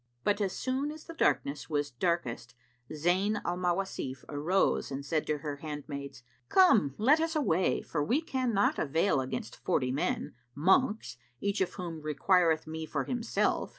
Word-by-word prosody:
But, 205 0 +1
as 195 -2 0
soon 265 +3 -1
as 310 0 -10
the 330 - -9
darkness 145 - 0
was 145 -1 -1
darkest 125 -4 -2 0.4
Zayn 185 +7 +1
al 175 - 0
Mawasif 180 -7 -2
arose 160 +7 +1
and 140 0 -5
said 155 +1 -1
to 150 - 0
her 145 -1 -5
handmaids, 140 -3 -7 0.3
"Come, 220 - +5
let 275 +9 +5
us 325 0 -1
away, 190 - +1
for 150 -3 -2
we 245 - +2
cannot 255 -9 0
avail 150 0 +2
against 130 -3 -5
forty 130 -2 +1
men, 140 - -1 0.2
monks, 190 - +2 0.2
each 200 0 -1
of 190 - 0
whom 170 -3 -5
requireth 160 +1 +2
me 160 0 -5
for - - -1
himself." 240 -2 0
165 Hz, 155 wpm, -30 LUFS, 145-205 Hz, 0.4 s, Come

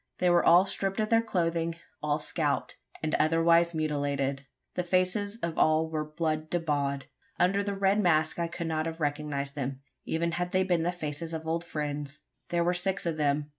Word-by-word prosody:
They 180 -1 +3
were 175 0 +4
all 175 +3 +7
stripped 195 0 -2
of 215 0 0
their 230 0 +5
clothing 170 -5 -1 0.3
all 150 -1 +1
scalped, 150 -1 -1 0.3
and 155 - -1
otherwise 165 +2 +4
mutilated. 140 -3 -1 0.3
The 180 - -1
faces 185 +4 0
of 170 -1 -2
all 155 +1 +3
were 155 -1 -1
blood 155 0 -2
bedaubed. 145 -5 -1 0.4
Under 185 +3 +3
the 200 0 -2
red 195 +2 +3
mask 160 -3 +2
I 170 - 0
could 170 0 -5
not 160 0 -1
have 165 0 -5
recognised 145 -2 -2
them 135 -1 -4 0.2
even 170 +1 -1
had 175 +2 -2
they 185 0 +3
been 175 -3 +1
the 175 +2 +1
faces 160 -1 -4
of 160 0 -6
old 165 +1 -1
friends! 145 -3 -4 0.3
There 170 0 +1
were 175 +1 +2
six 185 +2 +1
of 165 -2 -1
them. 145 0 +1
165 Hz, 190 wpm, -29 LUFS, 150-175 Hz, 0.4 s, all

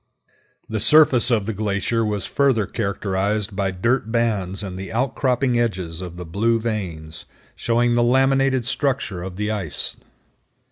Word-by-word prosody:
The 110 - -3
surface 130 -1 +5
of 110 -5 +1
the 110 - -2
glacier 105 +2 -1
was 105 -2 -1
further 130 -7 +2
characterized 100 0 -2
by 100 -1 0
dirt 115 +5 0
bands 105 -5 0
and 95 -2 -6
the 95 +1 -7
outcropping 125 +1 0
edges 95 -7 -2
of 90 -1 -8
the 90 - -7
blue 115 +7 +1
veins, 85 -9 -5 0.3
showing 120 +1 +1
the 120 - +3
laminated 135 +1 +2
structure 125 -7 -1
of 90 0 -6
the 105 +2 -2
ice. 100 -8 -4
110 Hz, 145 wpm, -22 LUFS, 95-120 Hz, 0.3 s, surface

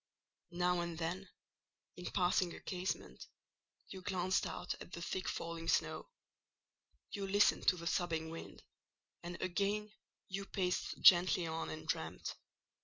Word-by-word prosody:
Now 180 0 +2
and 170 -1 -3
then, 175 +4 -3 0.7
in 180 - -8
passing 180 -1 +2
a - - -9
casement, 185 +1 -4 0.6
you 190 - -7
glanced 185 0 +1
out 180 - -3
at - - -10
the 170 - -5
thick 185 +2 -2
falling 165 0 -4
snow; - - +1 1.0
you 200 -1 -3
listened 205 +1 +4
to 180 - +6
the 170 - -7
sobbing 165 -2 0
wind, 165 - -8 0.6
and 175 0 -6
again 205 +3 0 0.4
you 195 +1 -4
paced 180 -2 -1
gently 180 -1 +7
on 165 0 -3
and 155 - -6
dreamed. - - -2
180 Hz, 135 wpm, -36 LUFS, 170-190 Hz, 1.0 s, gently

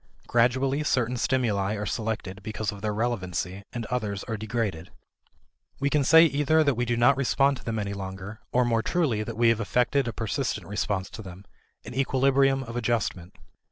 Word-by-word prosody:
Gradually 130 +4 +2
certain 125 -4 +1
stimuli 110 -6 0
are 105 0 -3
selected 105 -3 -3
because 110 0 -3
of 100 -1 -10
their 105 0 -1
relevancy, 100 -4 -2
and 120 -2 -4
others 105 -5 -2
are 115 - -4
degraded. 105 -6 -3 0.9
We 140 +1 0
can 150 -1 +3
say 160 +4 +7
either 155 +1 +3
that 140 -2 +2
we 120 +1 -1
do 120 0 0
not 120 +3 +5
respond 140 +1 +2
to - - -13
them 115 -1 -3
any 100 -1 -2
longer, 95 +2 -7
or 125 0 +3
more 115 -1 +2
truly 130 -5 0
that 110 +1 -5
we 115 0 +4
have 115 -1 +2
effected 125 +4 +1
a - - -1
persistent 115 +4 -2
response 100 -1 -2
to - - -8
them 95 -1 -11 0.4
an - - -8
equilibrium 135 +1 +2
of 115 -2 -8
adjustment. 110 -7 -2
115 Hz, 185 wpm, -26 LUFS, 105-130 Hz, 0.9 s, say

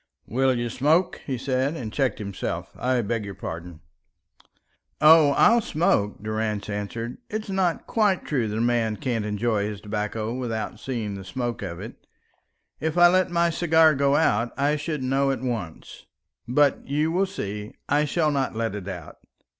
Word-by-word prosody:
"Will 130 +1 +1
you 120 0 -1
smoke?" 155 +9 +2
he 130 -3 -1
said, 135 +4 -1
and 110 -8 -6
checked 135 -3 0
himself. 100 -4 -4
"I 125 -1 0
beg 110 +1 -2
your 100 -1 -7
pardon." 85 0 -7 1.2
"Oh, 155 -1 +7
I'll 230 +10 +5
smoke," 105 - 0
Durrance 110 -1 -2
answered. 115 +4 -4
"It's 215 -1 -4
not 185 -3 0
quite 210 -5 +1
true 125 -7 0
that 105 +1 -3
a - - 0
man 115 -2 +1
can't 115 -3 -2
enjoy 105 0 0
his 105 -2 -5
tobacco 105 +2 -3
without 115 -4 -4
seeing 115 -6 -3
the 100 -1 -7
smoke 120 +4 -4
of 85 -4 -5
it. - - -10 0.7
If 160 +2 -2
I 175 0 +8
let 185 +1 +3
my 170 0 +2
cigar 160 -2 +4 0.2
out, 115 -6 +2
I 145 +2 +2
should 150 -2 -3
know 135 +2 +1
at 135 -3 -1
once. 115 -11 -5 0.4
But 140 +3 +2
you 150 +3 +1
will 190 +3 +1
see, 105 - -6
I 145 +2 +2
shall 155 +1 +1
not 135 -5 -1
let 115 -2 -1
it 100 -2 -6
out." 90 -5 -8
125 Hz, 170 wpm, -25 LUFS, 105-150 Hz, 1.2 s, I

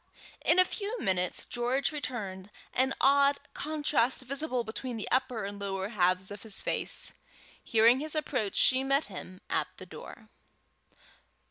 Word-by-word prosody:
In 335 - +4
a 370 - +7
few 425 +5 -4
minutes 180 - 0
George 245 +4 0
returned, 205 -10 -5 0.2
an 265 +1 +1
odd 280 +1 +5 0.2
contrast 290 -5 0
visible 260 -1 -2
between 230 +2 -5
the 215 - -4
upper 255 -4 +1
and 200 0 -6
lower 195 0 -3
halves 185 -2 +1
of 205 - -8
his 215 -3 0
face. - - +2 0.5
Hearing 230 +2 +5
his 310 +2 -5
approach 255 -9 -1
she 260 0 +5
met 275 +2 +2
him 185 0 -9
at - - 0
the - - -9
door. - - -11
250 Hz, 145 wpm, -30 LUFS, 205-280 Hz, 0.5 s, a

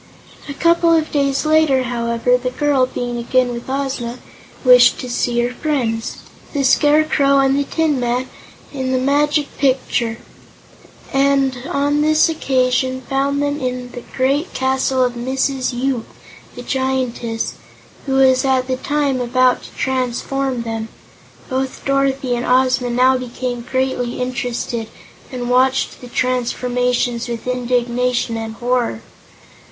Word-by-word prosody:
A 280 - -5
couple 335 +2 +3
of 315 -1 0
days 275 0 0
later, 310 -4 +3
however, 235 0 0
the 250 0 -1
girl, 275 -1 +1
being 245 -1 -4
again 250 +1 +1
with 235 +2 -7
Ozma, 265 -3 -3 0.5
wished 250 -1 +7
to 255 - -5
see 240 0 -1
her 240 +1 -1
friends, 245 -6 -2 0.4
the 285 -2 0
Scarecrow 290 0 +3
and 270 0 +3
the 285 0 0
Tin 305 -3 0
Woodman 245 +2 -1 0.5
in 260 -2 -2
the - - +2
Magic 290 +3 +1
Picture, 255 -4 0 1.0
and 275 -1 +2
on 290 -2 +1
this 310 +2 +4
occasion 260 -3 0
found 280 +1 0
them 290 +1 -1
in 250 -1 -3
the 245 - -8 0.2
great 275 +6 0
castle 260 0 +1
of 250 -1 0
Mrs. 260 +2 -1
Yoop, 250 -1 -2 0.5
the - - -8
Giantess, 255 -4 -2 0.5
who 270 - 0
was 260 -1 +4
at 260 -1 +2
the 255 0 -2
time 285 -2 0
about 255 +1 +2
to - - -11
transform 260 0 -1
them. 225 -1 -4 0.6
Both 260 0 -3
Dorothy 275 -1 +1
and 240 - -3
Ozma 255 0 +2
now 255 +2 +3
became 250 0 -4
greatly 260 -1 -2
interested 245 -2 -3 0.4
and 245 -2 -4
watched 255 +2 +1
the 250 - -9
transformations 245 -1 -1
with 235 -2 -5
indignation 250 -1 0
and 225 0 -5
horror. 240 - -1
255 Hz, 135 wpm, -18 LUFS, 245-275 Hz, 1.0 s, wished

